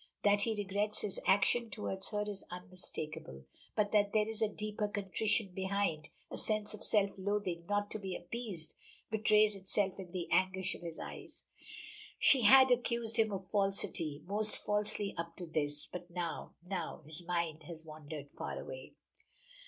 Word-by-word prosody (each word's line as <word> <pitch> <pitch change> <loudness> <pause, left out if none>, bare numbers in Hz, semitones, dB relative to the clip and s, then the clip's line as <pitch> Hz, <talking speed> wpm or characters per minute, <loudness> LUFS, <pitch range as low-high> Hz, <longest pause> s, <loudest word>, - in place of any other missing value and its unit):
That 205 0 +5
he 225 +1 +1
regrets 205 +1 0
his 200 - -1
action 230 +4 +4
toward 195 -3 -4
her 210 -1 -1
is 205 -2 -5
unmistakable, 160 - -6 0.3
but 210 -2 +2
that 205 -1 +3
there 215 0 +3
is 225 0 -5
a 220 - +4
deeper 210 0 -2
contrition 205 +1 +1
behind 190 -4 -1 0.2
a - - -2
sense 215 -1 +1
of 215 - -8
self 200 -2 +2
loathing 190 -4 -1
not 205 0 0
to 215 - -2
be 190 -3 -4
appeased 185 -4 -4 0.4
betrays 215 -1 +4
itself 195 0 0
in 180 -2 -8
the 175 -2 -3
anguish 190 0 +2
of - - -9
his 170 -2 -6
eyes. - - -8 0.7
She 270 - +6
had 260 +3 +8
accused 235 -2 +1
him 220 -1 +3
of 190 -2 -5
falsity, 195 -7 +1
most 210 +3 +2
falsely 210 -1 +1
up 170 0 -4
to 180 - -6
this, 150 -2 -1
but 180 0 -8
now 170 -1 -4
now 190 +1 -4
His 155 +3 -4
mind 170 -2 -1
has 160 -2 -8
wandered 155 -2 -8
far - - -5
away. - - -8
195 Hz, 165 wpm, -34 LUFS, 175-210 Hz, 0.7 s, had